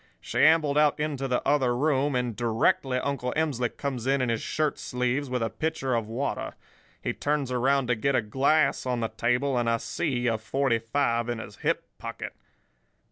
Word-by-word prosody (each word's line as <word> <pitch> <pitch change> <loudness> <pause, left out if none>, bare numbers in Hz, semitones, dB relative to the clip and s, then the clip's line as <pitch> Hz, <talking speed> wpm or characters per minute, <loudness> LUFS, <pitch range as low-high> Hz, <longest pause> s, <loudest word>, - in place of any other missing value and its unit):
She - - -4
ambled 155 -2 +5
out 150 0 +3
into 145 -3 -2
the 125 -1 -1
other 130 -4 +2
room, 140 0 +1
and 125 -3 -1
directly 120 +3 +1
Uncle 130 -2 -2
Emsley 140 -7 0
comes 130 -4 -3
in 135 +1 +3
in 125 -2 0
his 115 -1 0
shirt 155 -2 -1
sleeves, 125 +3 -1
with 125 -2 -1
a 115 - 0
pitcher 135 +1 -2
of 115 -2 0
water. 125 +6 -3 0.5
He - - -1
turns 145 -3 -1
around 135 +2 +2
to 125 0 +1
get 135 +5 0
a - - +3
glass 135 +6 +2
on 125 -2 0
the 115 - -1
table, 125 +4 +1
and 120 -1 +1
I 115 - +2
see 125 0 -2
a 115 -2 +1
forty 115 +2 0
five 120 0 0
in 120 - -1
his 110 - -9
hip - - -1
pocket. - - -6
125 Hz, 190 wpm, -27 LUFS, 120-140 Hz, 0.5 s, ambled